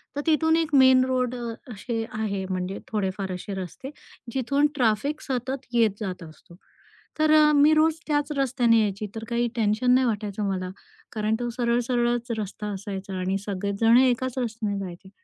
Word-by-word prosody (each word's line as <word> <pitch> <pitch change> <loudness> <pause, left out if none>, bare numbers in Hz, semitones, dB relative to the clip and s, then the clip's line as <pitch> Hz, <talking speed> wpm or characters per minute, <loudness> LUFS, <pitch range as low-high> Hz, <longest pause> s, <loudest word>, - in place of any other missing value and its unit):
तर 290 - -1
तिथून 320 +1 +3
एक 320 -3 0
मेन 260 -1 +7
रोड 255 -1 0
अ, 235 -1 -4 0.2
असे 225 +2 -3 0.2
आहे 200 -3 -2
म्हणजे 185 +1 -3
थोडेफार 190 -2 -2
असे 185 +2 -6
रस्ते 225 +9 -8 0.4
जिथून 275 +3 +2
ट्रॅफिक 255 +4 0
सतत 260 0 -3
येत 230 -3 +4
जात 185 -4 -5
असते. 165 +1 -15 0.6
तर 310 0 +3
अ, 300 0 +6
मी 295 +2 +6
रोज 310 0 +3
त्याच 295 -1 0
रस्त्याने 245 -4 +3
यायची 205 0 -2
तर 225 - -5
काही 235 0 +1
टेन्शन 225 +3 +2
नाही 255 0 +3
वाटायचं 210 -2 -2
मला. 185 -1 -3 0.4
कारण 215 0 0
तो 240 0 -2
सरळ 235 0 0
सरळच 240 -1 0
रस्ता 210 0 -5
असायचा 195 -1 -6
आणि 190 +1 0
सगळेजण 200 +4 +2
एकाच 255 0 +2
रस्त्याने 220 -4 -2
जायचे. 190 0 -8
230 Hz, 165 wpm, -25 LUFS, 200-260 Hz, 0.6 s, मेन